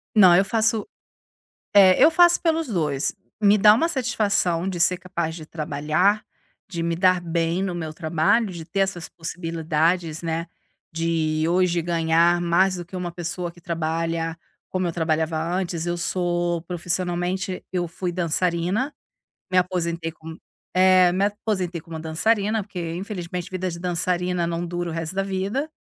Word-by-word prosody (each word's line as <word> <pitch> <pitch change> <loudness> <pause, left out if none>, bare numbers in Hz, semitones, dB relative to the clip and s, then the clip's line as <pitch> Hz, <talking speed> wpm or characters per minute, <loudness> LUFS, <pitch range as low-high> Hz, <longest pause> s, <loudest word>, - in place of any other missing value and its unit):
Não, 185 -5 +8
eu 190 +3 +5
faço 220 +1 +1 0.9
é, 195 -1 +6
eu 305 - +8
faço 345 +1 +5
pelos 325 -2 +1
2, 155 - 0 0.3
me 205 0 +5
dá 210 +1 +7
uma 260 +10 +2
satisfação 210 - 0
de 185 -2 -3
ser 180 +2 +4
capaz 170 -3 -4
de 160 -2 -9
trabalhar, 155 +7 0 0.4
de 175 -4 -5
me 165 0 -1
dar 185 +1 +3
bem 170 +1 -1
no 190 -2 -2
meu 160 -2 -5
trabalho, 170 +8 +1
de 170 -3 -8
ter 190 +4 -4
essas 190 -3 -1
possibilidades, 165 -1 -1
né, 165 +1 -2 0.4
de 160 -1 0
hoje 175 0 +2
ganhar 170 +1 +2
mais 185 +2 +2
do 175 - -6
que 185 - -11
uma 180 -1 -3
pessoa 175 0 -4
que 175 0 -19
trabalha 165 0 -2 0.3
como 185 -1 -1
eu - - -1
trabalhava 160 -1 0
antes. 170 0 -2
Eu 175 0 -2
sou 175 -1 0
profissionalmente 180 +1 -2
eu 175 -2 -1
fui 175 +2 -4
dançarina, 180 - 0 0.6
me 185 - 0
aposentei 170 -2 0
como 160 0 -10 0.4
é, 185 -1 +6
me 190 +2 +1
aposentei 200 -4 -2
como 160 0 -8
dançarina, 205 +7 0
porque, 180 -4 -5
infelizmente, 180 -1 -5
vida 185 0 -3
de 170 - -7
dançarina 180 0 -1
não 170 +1 -3
dura 175 0 -3
o - - -5
resto 165 +2 -4
da 195 - +2
vida, 195 +10 -2
175 Hz, 160 wpm, -23 LUFS, 165-190 Hz, 0.9 s, Não